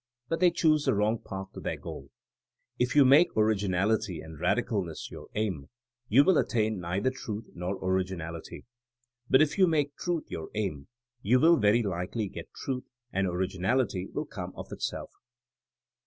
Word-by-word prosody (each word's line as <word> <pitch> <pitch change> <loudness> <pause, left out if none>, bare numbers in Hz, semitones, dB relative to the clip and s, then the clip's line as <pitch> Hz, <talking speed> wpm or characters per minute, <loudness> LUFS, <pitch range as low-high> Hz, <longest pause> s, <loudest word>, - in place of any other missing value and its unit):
But 165 - 0
they 180 - +6
choose 155 -3 +2
the - - +3
wrong 105 +2 +1
path 95 0 -7
to - - -8
their - - -3
goal. - - -8 0.7
If 125 +2 +1
you 145 -2 +7
make 145 +5 +5
originality 100 -3 +1
and 80 -1 -10
radicalness 90 -7 -1
your - - -9
aim, 95 -10 -2 0.4
you 130 +7 +7
will 185 +1 +4
attain 110 -3 0
neither 90 +8 -1
truth 110 -4 -6
nor 90 +2 -3
originality. 90 -3 -3 0.6
But 130 +3 +7
if 155 +6 -2
you 185 - +7
make 145 -3 +1
truth 175 -3 -2
your 80 - -6
aim 95 -10 -3 0.3
you 125 +4 +4
will 165 +3 +6
very 105 +1 +4
likely 95 +2 -2
get - - -8
truth, 130 -1 -4 0.3
and 95 0 +1
originality 95 +3 0
will 150 - -4
come 90 -9 -7
of - - -9
itself. - - -4
105 Hz, 160 wpm, -29 LUFS, 95-130 Hz, 0.7 s, you